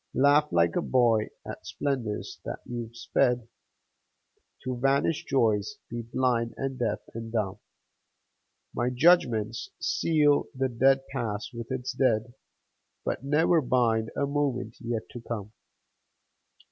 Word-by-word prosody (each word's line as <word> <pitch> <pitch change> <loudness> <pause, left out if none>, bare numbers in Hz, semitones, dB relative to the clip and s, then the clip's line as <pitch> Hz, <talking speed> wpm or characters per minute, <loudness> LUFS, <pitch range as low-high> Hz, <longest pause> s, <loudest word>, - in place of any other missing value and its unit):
Laugh 145 +2 +4
like 85 -1 +3
a - - +2
boy 115 -4 +3 0.2
at - - -7
splendors 125 -7 -3
that - - -5
have 120 -1 -5
sped, 120 0 +1 1.2
To 130 0 -2
vanished 135 +4 +1
joys 110 -7 +1 0.2
be 120 0 -3
blind 115 0 0
and 135 -1 -3
deaf 115 -4 0
and 115 0 -6
dumb; 105 -3 -1 1.1
My 120 +1 0
judgments 125 -6 +3
seal 150 -3 +3
the 130 0 0
dead 135 +3 +3
past 115 -4 -3
with 115 0 -7
its 130 0 -2
dead, 120 -2 +1 0.7
But - - -2
never 160 +4 +3
bind 115 -4 +2
a 140 - +1
moment 135 -5 -1
yet 115 -2 -2
to 120 - -8
come. 110 -3 -5
120 Hz, 125 wpm, -28 LUFS, 115-135 Hz, 1.2 s, Laugh